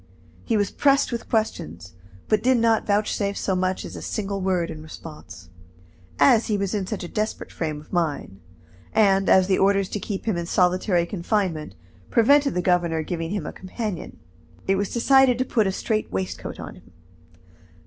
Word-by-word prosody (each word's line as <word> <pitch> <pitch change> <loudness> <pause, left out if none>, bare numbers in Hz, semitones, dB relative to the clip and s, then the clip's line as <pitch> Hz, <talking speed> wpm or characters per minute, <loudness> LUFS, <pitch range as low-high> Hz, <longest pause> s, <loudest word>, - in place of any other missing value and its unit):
He 225 - 0
was 205 -2 0
pressed 275 -1 +3
with 235 -1 -5
questions, 90 - -2 0.3
but 215 -1 +2
did 255 +1 +3
not 230 -1 +2
vouchsafe 205 -1 0
so 190 - -1
much 185 0 -1
as - - -8
a - - -7
single 200 -2 -3
word 185 -3 0
in 155 - -8
response. 155 - -11 0.7
As 235 -4 +5
he 210 - +1
was 200 0 -2
in 200 -3 -2
such 215 -3 -4
a - - -5
desperate 215 +4 -3
frame 155 -3 -3
of 150 - -16
mind, 150 - -2 0.5
and 195 -3 +3
as 190 -1 +6
the 190 0 +1
orders 195 -1 +2
to 210 - -3
keep 195 0 -5
him 215 -6 0
in 170 0 -3
solitary 180 0 +2
confinement 170 - -2 0.3
prevented 280 +5 +4
the 180 - 0
governor 170 -3 +1
giving 165 0 -4
him 200 -4 -3
a - - -6
companion, 190 -1 -6 0.5
it 195 - +3
was 200 0 -1
decided 260 +1 +4
to 255 - 0
put 220 -5 +1
a - - +1
straight 215 +3 -2
waistcoat 95 -1 -4
on - - -7
him. - - -20
195 Hz, 180 wpm, -24 LUFS, 170-215 Hz, 0.7 s, as